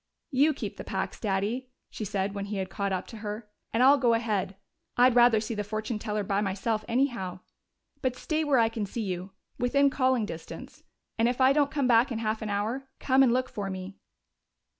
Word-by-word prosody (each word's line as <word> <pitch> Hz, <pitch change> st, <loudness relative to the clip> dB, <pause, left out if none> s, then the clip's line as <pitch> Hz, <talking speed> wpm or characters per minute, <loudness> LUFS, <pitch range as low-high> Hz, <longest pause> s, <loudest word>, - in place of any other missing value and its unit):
"You 290 Hz, +3 st, +3 dB
keep -, -, -5 dB
the -, -, -6 dB
packs, -, -, -3 dB
Daddy," 215 Hz, +5 st, -1 dB, 0.2 s
she 215 Hz, -, -5 dB
said 195 Hz, 0 st, -2 dB
when 200 Hz, -1 st, -4 dB
he 205 Hz, 0 st, -4 dB
had 190 Hz, -1 st, -3 dB
caught 200 Hz, +1 st, -2 dB
up 185 Hz, -1 st, -2 dB
to 225 Hz, -, -10 dB
her, 210 Hz, +1 st, -6 dB, 0.2 s
"and 230 Hz, +3 st, +2 dB
I'll 275 Hz, +2 st, +7 dB
go 240 Hz, -3 st, +4 dB
ahead. 210 Hz, -4 st, -1 dB, 0.4 s
I'd 250 Hz, +1 st, +6 dB
rather 240 Hz, -2 st, +6 dB
see 220 Hz, +2 st, -4 dB
the 210 Hz, -1 st, -2 dB
fortune 215 Hz, +2 st, -3 dB
teller 210 Hz, -1 st, -2 dB
by 200 Hz, +1 st, 0 dB
myself, 210 Hz, +2 st, -1 dB
anyhow. 230 Hz, -8 st, -1 dB, 0.6 s
But 255 Hz, -2 st, 0 dB
stay 310 Hz, +4 st, -1 dB
where 290 Hz, -3 st, +3 dB
I 230 Hz, -1 st, +5 dB
can 225 Hz, -2 st, -3 dB
see 225 Hz, +3 st, -4 dB
you 185 Hz, -1 st, -4 dB, 0.3 s
within 280 Hz, +3 st, +3 dB
calling 255 Hz, -4 st, +2 dB
distance. 165 Hz, -5 st, -9 dB, 0.4 s
And 230 Hz, +1 st, +4 dB
if 245 Hz, -, -3 dB
I 260 Hz, +1 st, +6 dB
don't 285 Hz, -1 st, +3 dB
come 280 Hz, -1 st, 0 dB
back 240 Hz, +2 st, +4 dB
in 230 Hz, -, -2 dB
half 220 Hz, -1 st, -2 dB
an 215 Hz, -, -3 dB
hour, 225 Hz, +7 st, -2 dB
come 265 Hz, 0 st, +3 dB
and 260 Hz, -3 st, +5 dB
look 255 Hz, +1 st, +1 dB
for 200 Hz, -2 st, -5 dB
me." 190 Hz, +1 st, -7 dB
225 Hz, 210 wpm, -28 LUFS, 200-255 Hz, 0.6 s, I'll